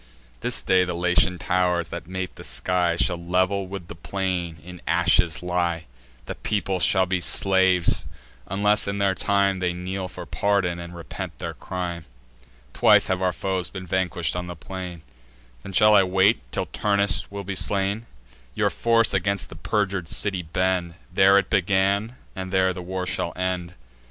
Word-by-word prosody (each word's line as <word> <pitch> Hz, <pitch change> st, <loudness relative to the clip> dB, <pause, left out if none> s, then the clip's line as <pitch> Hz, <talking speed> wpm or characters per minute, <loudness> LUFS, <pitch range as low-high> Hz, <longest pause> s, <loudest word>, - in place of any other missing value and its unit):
This -, -, 0 dB
day 95 Hz, -1 st, +4 dB
the 90 Hz, -1 st, -3 dB
Latian 90 Hz, +1 st, +2 dB
tow'rs, 90 Hz, -1 st, 0 dB
that -, -, -7 dB
mate 95 Hz, 0 st, -5 dB
the -, -, -10 dB
sky, 85 Hz, +8 st, 0 dB
Shall 85 Hz, 0 st, -1 dB
level 95 Hz, +2 st, +1 dB
with 95 Hz, -2 st, -7 dB
the -, -, -8 dB
plain 90 Hz, -1 st, -3 dB
in 90 Hz, -1 st, -10 dB
ashes 85 Hz, 0 st, +2 dB
lie: 85 Hz, -1 st, -1 dB, 0.4 s
The -, -, -4 dB
people 95 Hz, -3 st, -2 dB
shall 95 Hz, +1 st, +3 dB
be 90 Hz, 0 st, 0 dB
slaves, 95 Hz, -2 st, +3 dB, 0.4 s
unless 105 Hz, +2 st, +1 dB
in 100 Hz, 0 st, -2 dB, 0.2 s
time 100 Hz, 0 st, +1 dB
They 90 Hz, -1 st, 0 dB
kneel 90 Hz, +1 st, -4 dB
for -, -, -9 dB
pardon, 95 Hz, -4 st, 0 dB
and 85 Hz, 0 st, -8 dB
repent 85 Hz, -3 st, -7 dB
their -, -, -5 dB
crime. 85 Hz, -3 st, -5 dB, 0.7 s
Twice -, -, +5 dB
have 95 Hz, 0 st, 0 dB
our 90 Hz, -1 st, +2 dB
foes 95 Hz, 0 st, -2 dB
been 95 Hz, -1 st, -7 dB
vanquish'd 90 Hz, -2 st, -1 dB
on 90 Hz, 0 st, -3 dB
the 90 Hz, -, -6 dB
plain: 90 Hz, 0 st, -7 dB, 0.6 s
Then 95 Hz, -, -8 dB
shall 105 Hz, +3 st, +5 dB
I 100 Hz, -, +7 dB
wait 95 Hz, +3 st, +3 dB
till -, -, -2 dB
Turnus 100 Hz, -3 st, 0 dB
will 100 Hz, 0 st, -6 dB
be 100 Hz, 0 st, -4 dB
slain? 100 Hz, +4 st, -1 dB, 0.5 s
Your -, -, +1 dB
force 115 Hz, -2 st, +3 dB
against 100 Hz, +1 st, 0 dB
the -, -, -10 dB
perjur'd 95 Hz, -1 st, -1 dB
city 95 Hz, -3 st, +4 dB
bend. 90 Hz, +1 st, -1 dB, 0.2 s
There 95 Hz, +1 st, +6 dB
it 100 Hz, -, 0 dB
began, 100 Hz, +5 st, +1 dB, 0.2 s
and 95 Hz, -1 st, -5 dB
there 95 Hz, -1 st, +2 dB
the 90 Hz, -, -7 dB
war 90 Hz, +1 st, -4 dB
shall 90 Hz, -2 st, -2 dB
end. 90 Hz, -1 st, -3 dB
95 Hz, 165 wpm, -24 LUFS, 90-95 Hz, 0.7 s, I